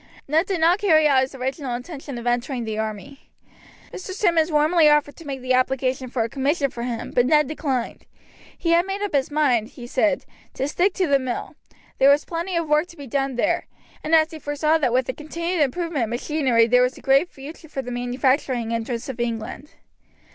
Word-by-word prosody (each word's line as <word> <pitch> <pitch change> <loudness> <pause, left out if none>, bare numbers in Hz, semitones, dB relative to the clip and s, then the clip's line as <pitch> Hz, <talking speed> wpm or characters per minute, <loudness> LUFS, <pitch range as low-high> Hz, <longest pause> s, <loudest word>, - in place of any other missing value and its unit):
Ned 320 +6 +2
did 380 -4 -1
not 340 +4 +4
carry 315 -7 +4
out 270 -3 +4
his 265 +1 -3
original 265 0 -3
intention 275 0 -7
of 235 - -7
entering 245 +1 -1
the 220 -1 -3
army. 220 +6 -6 0.6
Mr. 375 0 -6
Simmonds 345 -5 +2
warmly 305 +1 +4
offered 295 -1 +2
to 330 - -12
make 270 -2 -5
the 255 0 0
application 255 0 0
for 240 -2 -1
a - - -2
commission 275 +3 0
for 235 - -7
him, 235 -1 -4
but 245 0 +2
Ned 300 0 +4
declined. 270 -5 -3 0.5
He 335 - -1
had 340 +2 +3
made 395 +1 -3
up 410 - -3
his 275 -2 +1
mind, 270 -7 +2
he 240 - -11
said, 275 +4 0 0.3
to 270 - -1
stick 360 +6 +1
to 375 - +1
the 280 -3 +3
mill; 255 -2 -4 0.5
there 270 - +6
was 285 +1 +4
plenty 345 +2 -3
of 335 -1 -1
work 300 +3 +2
to 340 - -15
be 285 - -8
done 270 +1 -1
there, 240 - 0 0.4
and 320 +2 +3 0.2
he 320 - -8
foresaw 305 +2 +1
that 260 -5 +1
with 255 +1 +1
a 255 - -2
continued 335 +4 -3
improvement 295 -1 0
of - - -8
machinery 245 -1 +2
there 250 +2 +4
was 250 +1 +1
a - - -12
great 275 +6 +3
future 295 +3 -11
for 270 -2 -4
the 250 - -6
manufacturing 245 -1 0
interests 230 0 -3
of 260 -3 -6
England. 235 +4 -4
275 Hz, 210 wpm, -23 LUFS, 250-315 Hz, 0.6 s, there